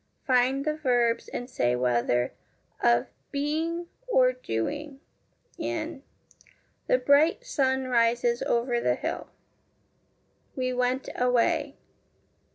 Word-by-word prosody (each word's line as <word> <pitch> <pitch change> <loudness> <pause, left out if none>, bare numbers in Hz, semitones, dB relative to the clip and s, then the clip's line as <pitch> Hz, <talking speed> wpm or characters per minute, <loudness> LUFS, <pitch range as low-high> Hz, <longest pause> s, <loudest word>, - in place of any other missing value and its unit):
Find 260 +2 +2
the 305 - +1
verbs, 245 -5 +1
and 245 - -5
say 125 - 0
whether 120 0 +1 0.5
of 120 +1 +4 0.2
being 315 +4 -2 0.2
or - - +4
doing, 295 - -4 0.6
in 315 -3 -3 0.9
The - - +4
bright 285 - +3
sun 265 - +1
rises 235 0 +2
over 240 0 +1
the 125 - +2
hill. - - -4 1.3
We 255 -1 -1
went 250 +1 0
away. 275 +4 +1
260 Hz, 100 wpm, -27 LUFS, 240-300 Hz, 1.3 s, of